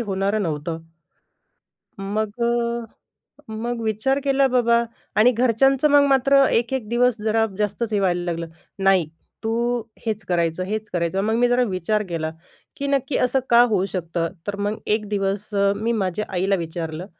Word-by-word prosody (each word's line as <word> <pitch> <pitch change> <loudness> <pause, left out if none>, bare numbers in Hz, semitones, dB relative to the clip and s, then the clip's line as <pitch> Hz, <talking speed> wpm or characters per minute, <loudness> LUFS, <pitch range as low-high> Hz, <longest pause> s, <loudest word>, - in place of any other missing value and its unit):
होणारं 200 0 -1
नव्हतं. 160 0 -3 1.2
मग 210 +3 -3
अ, 235 0 0 0.7
मग 230 +2 -3
विचार 220 +5 0
केला 275 -1 +3
बाबा 235 -2 +3 0.3
आणि 240 +4 +6
घरच्यांचं 255 +4 +3
मग 285 0 +6
मात्र 275 0 +4
एक-एक 235 -1 0
दिवस 245 0 +3
जरा 225 +1 +2
जास्तच 210 +2 -2
हे 205 - +2
व्हायला 180 -2 +1
लागलं. 170 -1 -3 0.3
नाही, 190 -4 +3 0.4
तू 235 +2 0 0.2
हेच 215 -2 -2
करायचं, 170 0 0
हेच 215 +3 -4
करायचं. 175 +2 0
मग 220 +2 0
मी 245 +1 +3
जरा 245 +1 +3
विचार 195 +3 -1
केला, 160 -2 -2 0.5
की 280 - -3
नक्की 275 -1 0
असं 255 +2 +2
का 235 0 +7
होऊ 195 -3 +1
शकतं? 170 -2 -2 0.2
तर 205 - -2
मग 205 +1 -2 0.2
एक 215 -1 -5
दिवस 200 +1 -2
अ, 200 0 +3
मी 225 +3 -1
माझ्या 205 -2 -1
आईला 190 +2 +1
विचारलं, 165 -1 -5
215 Hz, 155 wpm, -22 LUFS, 190-240 Hz, 1.2 s, का